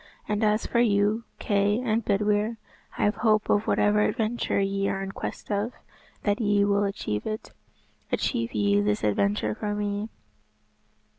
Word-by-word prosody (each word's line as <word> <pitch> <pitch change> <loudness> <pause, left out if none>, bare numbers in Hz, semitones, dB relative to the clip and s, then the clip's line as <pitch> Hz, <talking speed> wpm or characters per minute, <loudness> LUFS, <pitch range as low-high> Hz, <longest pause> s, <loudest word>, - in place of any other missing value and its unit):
And 210 +1 0
as 215 +1 +2
for 235 - 0
you, 215 0 +2
Kay 205 +1 +1
and 230 -2 0
Bedwyr, 210 +2 +1 0.4
I - - 0
have 210 +1 +2
hope 215 -2 +2
of 205 +1 +2
whatever 210 0 +3
adventure 220 0 0
ye 195 0 0
are 195 - -2
in 195 - -5
quest - - -6
of, 205 +4 -1 0.5
that 205 +3 +1
ye 205 -1 +3
will 200 0 +2
achieve 105 - -3
it. 215 0 -5 0.6
Achieve 115 0 0
ye 100 -1 +3
this 105 0 0
adventure 105 +1 +1
for 205 - -3
me." 205 +1 -2
205 Hz, 155 wpm, -26 LUFS, 195-215 Hz, 0.6 s, whatever